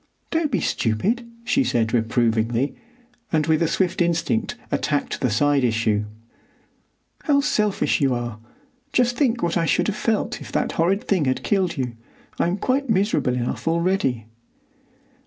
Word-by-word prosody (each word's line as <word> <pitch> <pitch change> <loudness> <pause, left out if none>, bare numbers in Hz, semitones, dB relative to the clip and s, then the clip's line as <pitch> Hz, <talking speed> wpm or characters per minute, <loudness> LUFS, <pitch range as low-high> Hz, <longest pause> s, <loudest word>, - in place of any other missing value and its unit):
"Don't 320 -2 +1
be 205 - +1
stupid," 205 - 0 0.2
she 270 +3 +2
said 115 - 0
reprovingly, 115 +2 +1 0.6
and 155 -2 +2
with 160 +1 +2
swift 185 +1 0
instinct 175 +8 0 0.2
attacked 145 -2 -1
the 130 - +2
side 140 +5 +2
issue. 110 -3 +1 1.2
"How 285 -3 +4
selfish 210 - +1
you 135 -3 +2
are! 120 -2 -4 0.5
Just 245 -1 +2
think 245 -3 +1
what 170 0 +1
I 165 -1 +1
should - - +2
have 210 - -1
felt 215 0 -1
if - - -9
that - - 0
horrid 185 +5 +1
thing 185 -7 +2
had 130 0 -1
killed 190 -5 0
you! 125 -3 -3 0.4
I'm 175 +3 +1
quite 265 +5 0
miserable 195 - +1
enough 125 +5 -3
already." 165 - +1
165 Hz, 145 wpm, -23 LUFS, -, 1.2 s, How